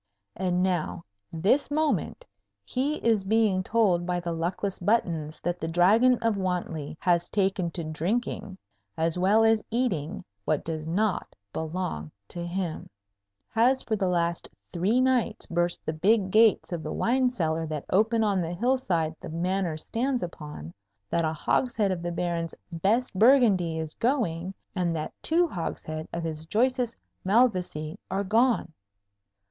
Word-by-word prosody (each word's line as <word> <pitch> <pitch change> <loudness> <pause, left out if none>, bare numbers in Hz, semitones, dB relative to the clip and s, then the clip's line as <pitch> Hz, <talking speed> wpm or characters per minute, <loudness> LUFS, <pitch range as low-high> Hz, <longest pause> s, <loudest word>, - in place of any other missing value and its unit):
And 180 0 0
now, 175 -2 -1 0.3
this 195 - +2
moment, 310 +10 0 0.4
he 275 +4 -1
is 220 -4 +3
being 210 -2 +2
told 190 -4 +2
by 180 0 -1
the 170 -1 -4
luckless 175 +4 -2
Buttons 170 -7 0
that 175 +1 -2
the 160 - -3
Dragon 210 +10 +4
of 225 -3 +2
Wantley 175 -5 -3
has 175 -1 +2
taken 190 -3 +1
to 170 0 -5
drinking, 190 +5 -2 0.4
as 165 +2 +1
well 205 +5 +4
as 225 -1 +4
eating, 205 - -1 0.2
what 150 +7 0
does 155 -1 -4
not 195 +4 -1 0.2
belong 160 - -3 0.2
to 175 - -5
him; 175 -1 -4 0.6
has 250 +4 +3
for 220 - -1
the 195 -3 0
last 170 -1 0 0.2
three 190 +8 +2
nights 255 -4 +1
burst 175 0 -1
the 155 - -1
big 190 +4 +2
gates 220 -1 +4
of 170 -2 -3
the - - -5
wine 255 +2 +2
cellar 165 -8 -1
that 155 -2 -4
open 220 +3 +3
on 200 -3 +2
the 170 +1 -3
hillside 185 -9 0
the - - -7
Manor 175 0 -1
stands 245 - -1
upon; 150 - -7 0.4
that 170 - +2
a 155 - +1
hogshead 205 - +1
of 180 -2 -2
the 175 0 -3
Baron's 170 -1 -2 0.2
best 205 +10 +1
Burgundy 200 -7 +4
is 160 -1 -4
going; 195 - -1 0.2
and 175 -3 0
that 155 - -4
two 340 +2 +3
hogsheads 155 - -5
of 170 - -4
his 160 -1 -5
choicest 245 +3 +1 0.3
Malvoisie 185 -6 +1
are 195 +1 -1
gone! 225 -3 +2
185 Hz, 150 wpm, -27 LUFS, 165-225 Hz, 0.6 s, Dragon